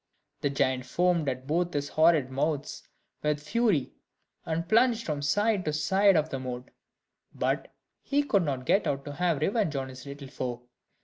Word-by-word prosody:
The 145 - 0
giant 130 -2 0
foamed 175 -3 +2
at 130 0 -5
both 170 +3 0
his 145 0 -1
horrid 155 -5 +3
mouths 145 +2 -2 0.4
with 150 -1 0
fury, 175 - +1 0.5
and 165 +1 -2
plunged 230 +2 +3
from 150 -2 -2
side 205 +7 +1
to 155 - -1
side 190 +6 +3
of 155 0 +2
the 135 - -2
moat; 125 0 -6 0.6
but - - -1 0.3
he 285 +1 +1
could 205 -9 +2
not 135 -6 -2
get 195 +2 +3
out 140 -2 -2
to 145 - -5
have 170 -2 0
revenge 195 -3 +1
on 135 -1 -2
his 130 +1 -11
little 140 0 -8
foe. 125 -3 -5
150 Hz, 175 wpm, -28 LUFS, 135-180 Hz, 0.6 s, horrid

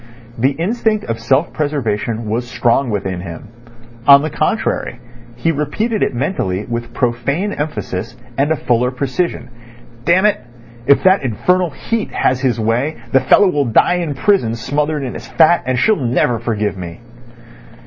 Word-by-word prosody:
The 130 +4 +1
instinct 215 - -1
of 115 -1 -3
self 140 +5 +1
preservation 115 -6 -2
was 120 +3 -2
strong 120 +2 +1
within 95 -4 -3
him. 85 +4 -9 0.6
On 140 0 +8
the 155 - -3
contrary, - - -1 0.4
he 120 +8 0
repeated 205 - -1
it - - 0
mentally 105 - -2
with 120 -1 -4
profane 130 - -1
emphasis 145 - -4 0.2
and 145 +3 +1
a - - +3
fuller 125 -3 +1
precision: 130 +2 -2 0.6
"Damn 180 +8 +3
it! 210 - +3 0.5
If 140 - +5
that 190 +1 +5
infernal 180 - +1
Heat 225 +9 -3
has 130 0 +1
his 125 -4 0
way 120 +8 0 0.2
the 135 - +5
fellow'll 145 +1 +4
die 120 +9 +3
in 155 -4 -3
prison 135 - +2
smothered 145 +5 -1
in 125 - -4
his - - -8
fat, 170 +1 +4
and 130 -1 +1
she'll 215 - +3
never 120 -1 +1
forgive 105 -3 -2
me." 85 -1 -8
135 Hz, 155 wpm, -17 LUFS, 115-160 Hz, 0.6 s, On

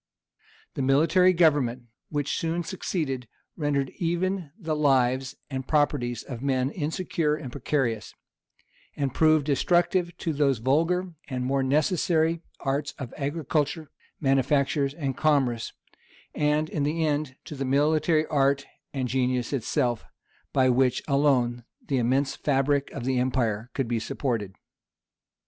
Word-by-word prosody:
The - - -3
military 160 +8 +4
government, 145 -8 +2 0.3
which 145 -2 -1
soon 165 +1 -1
succeeded, 150 -9 -3 0.3
rendered 145 -4 -1
even 175 0 -1
the 165 -7 -2
lives 130 -2 +2
and 130 -2 -5
properties 140 -6 +1
of 125 -4 -7
men 130 -1 0
insecure 160 -1 -1
and 145 -5 -7
precarious; 120 -4 -2 0.8
and 135 -3 -1
proved 155 -1 +4
destructive 175 +4 +1
to 165 - -2
those 140 -3 +2
vulgar 165 +9 +1
and 125 -2 -3
more 135 +1 +1
necessary 160 +3 +1 0.2
arts 140 +1 -2
of 130 -4 -7
agriculture, 150 +1 -2 0.3
manufactures, 140 +1 +1
and 140 -5 -3
commerce; 135 -7 +1 0.6
and, 150 +1 +1
in 155 - -3
the 160 +3 0
end, 145 -3 -1
to - - -7
the 140 -1 -3
military 155 +4 +2
art 140 -2 +1 0.3
and 130 -2 -2
genius 125 0 0
itself, 125 -2 0 0.5
by 130 -1 +3
which 125 0 +2
alone 130 -4 +2 0.3
the 135 -2 +2
immense 130 +4 +1
fabric 140 0 +1
of 130 -4 -6
the 130 -1 +1
empire 120 -3 0
could 135 -3 -1
be 115 -1 0
supported. 110 -5 -3
140 Hz, 130 wpm, -26 LUFS, 130-155 Hz, 0.8 s, military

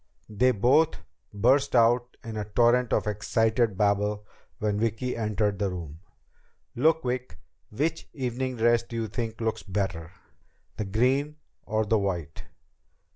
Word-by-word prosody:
They 120 +5 +3
both 130 +8 +3 0.4
burst 130 +7 +2
out 120 +1 +3
in 115 -1 -6
a 105 - -2
torrent 120 +3 +3
of - - +1
excited 110 +1 +1
babble 105 0 +1 0.3
when 105 -1 -1
Vicki 115 +3 -1
entered 105 -3 -1
the 100 - 0
room. 80 -4 -7 0.8
"Look, 160 +5 +3
Vic. 125 -9 -3 0.3
Which 155 +9 -2
evening 130 -1 -3
dress 120 0 +3
do 120 0 -10
you 115 -1 -2
think 110 +1 -4
looks 110 -1 -1
better? 95 -4 -3 0.7
The 105 - -2
green 130 +9 +1 0.3
or 110 0 0
the 110 +1 +2
white?" 85 -6 -4
110 Hz, 135 wpm, -27 LUFS, 105-125 Hz, 0.8 s, They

